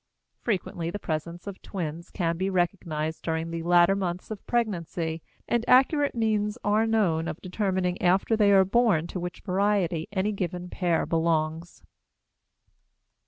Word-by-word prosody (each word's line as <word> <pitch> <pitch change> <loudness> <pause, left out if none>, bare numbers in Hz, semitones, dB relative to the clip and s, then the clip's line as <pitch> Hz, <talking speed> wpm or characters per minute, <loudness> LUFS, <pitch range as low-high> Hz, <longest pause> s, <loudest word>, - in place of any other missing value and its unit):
Frequently, 180 -6 -2
the 180 - -4
presence 170 -1 -4
of 200 -2 -7
twins 170 -2 -5
can 170 -3 -1
be 190 +3 -1
recognized 170 -4 -1
during 160 0 -2
the 165 0 -3
latter 175 +2 +5
months 185 0 -3
of 210 - -6
pregnancy, 170 -8 -1 0.3
and 235 -1 +1
accurate 280 +3 +4
means 215 -1 0
are 215 +2 +2
known 180 -8 +1
of 160 0 -5
determining 185 -2 -1
after 190 +5 +3
they 210 -2 +4
are 190 -1 +6
born 205 -6 +3
to 180 - -5
which 175 0 -6
variety 190 -4 0
any 205 +1 0
given 180 -2 -4
pair 175 -3 0
belongs. 165 0 -1
180 Hz, 145 wpm, -27 LUFS, 165-205 Hz, 0.3 s, are